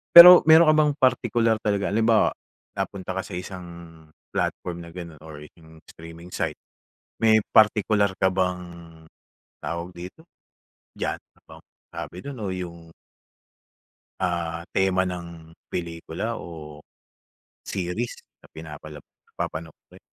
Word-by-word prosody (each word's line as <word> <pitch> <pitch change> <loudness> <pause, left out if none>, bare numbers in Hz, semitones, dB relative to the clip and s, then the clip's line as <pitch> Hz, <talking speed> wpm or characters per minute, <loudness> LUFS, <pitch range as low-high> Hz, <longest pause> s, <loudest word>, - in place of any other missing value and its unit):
Pero, 175 +1 +13
meron 160 +1 +8
ka - - +6
bang 150 -1 +3
partikular 120 -4 +2
talaga, 100 -2 0
halimbawa 115 +1 +3 0.4
napunta 95 -1 -4
ka 95 - -2
sa 100 - -10
isang 90 0 -7 0.7
platform 85 -1 -2
na 85 - -10
ganun 85 -4 -9
or 75 -2 -10
yung 80 -1 -18
streaming 85 +1 -12
site, - - -2 0.6
may 110 -1 +5 0.2
partikular 105 -2 +4
ka 95 - +3
bang, 90 -1 0 1.0
tawag 85 +1 -4
dito, 90 - -10 0.7
genre? - - -4 0.6
Sabi 90 - -7
dun 140 +2 -7
o 95 - -2
yung 85 -2 -8 1.3
Ah, 85 -2 -2
tema 95 -1 +2
ng 85 -2 -8 0.2
pelikula 85 +6 -4
o 75 -5 -10 0.8
series 95 +6 -3 0.2
na - - -19
pinapalab 75 -1 -10
na - - -40
papanoorin. 80 0 -7
90 Hz, 115 wpm, -24 LUFS, 85-105 Hz, 1.3 s, Pero